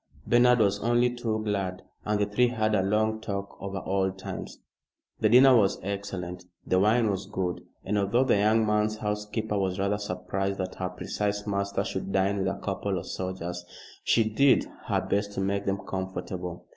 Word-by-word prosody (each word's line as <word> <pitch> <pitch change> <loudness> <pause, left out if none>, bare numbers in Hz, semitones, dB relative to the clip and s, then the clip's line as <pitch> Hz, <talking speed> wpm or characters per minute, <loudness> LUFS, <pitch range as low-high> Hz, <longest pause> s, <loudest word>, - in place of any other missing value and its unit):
Bernard 120 +1 +5
was 100 -3 +2
only 120 +2 +2
too 110 -3 -2
glad, 95 -3 -2 0.2
and 105 0 +1
the 105 - +3
three 105 +5 +2
had 110 -3 0
a 100 - +3
long 110 +3 +1
talk 100 -2 -4
over 100 -1 -4
old 95 0 0
times. 95 - -7 0.6
The 110 - +3
dinner 130 +3 +8
was 100 -4 +3
excellent, 95 -2 -4 0.2
the 95 - +2
wine 110 +2 +3
was 95 0 -4
good, 95 -3 -2 0.2
and 105 +2 +1
although 100 +6 +2
the 125 -5 +3
young 110 +2 +3
man's 105 0 +1
housekeeper 105 0 -2
was 95 -1 -1
rather 100 +1 0
surprised 95 0 -3
that 95 -1 -3
her 90 -1 -3
precise 105 +3 -3
master 100 -1 -1
should 95 -2 -4
dine 95 +1 +1
with 95 - 0
a 95 - -2
couple 100 -1 -2
of 85 - -5
soldiers, 90 -1 -4 0.4
she 115 -2 +3
did 130 +5 +4 0.2
her - - +1
best 100 0 -1
to - - -4
make 100 +1 -1
them 100 0 +1
comfortable. 95 -2 -5
100 Hz, 185 wpm, -27 LUFS, 95-110 Hz, 0.6 s, dinner